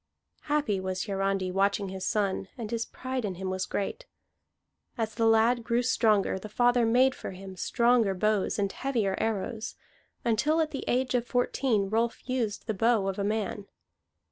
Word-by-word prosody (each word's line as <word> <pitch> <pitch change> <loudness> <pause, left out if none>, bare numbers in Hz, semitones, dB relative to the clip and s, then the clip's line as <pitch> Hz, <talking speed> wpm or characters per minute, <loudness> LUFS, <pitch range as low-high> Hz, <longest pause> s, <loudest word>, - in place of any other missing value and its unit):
Happy 290 -10 +1
was 185 0 -2
Hiarandi 195 -2 -1
watching 200 +1 +1
his 190 0 -6
son, 200 -3 0
and 225 -3 -5
his 230 -1 -1
pride 255 -1 -4
in 195 -3 -3
him 185 +1 -4
was 185 -1 -2
great. 455 - -3 0.9
As 225 -2 -2
the 230 -1 +2
lad 225 +2 +4
grew 235 +2 +1
stronger, 215 -6 +2
the 215 - -8
father 245 +1 +3
made 255 +3 +4
for - - -7
him 190 0 -9
stronger 235 0 +2
bows 210 +1 +1
and 200 -2 0
heavier 230 -8 -1
arrows, 220 +1 -2 0.5
until 295 +8 +2
at 315 -1 +1
the 275 - -5
age 255 +1 +1
of 245 -1 0
fourteen 245 -4 +1
Rolf 230 +4 -1
used 240 -5 -2
the 220 - -1
bow 220 -1 +2
of 195 0 -2
a - - 0
man. 210 -1 -2
220 Hz, 170 wpm, -28 LUFS, 195-245 Hz, 0.9 s, lad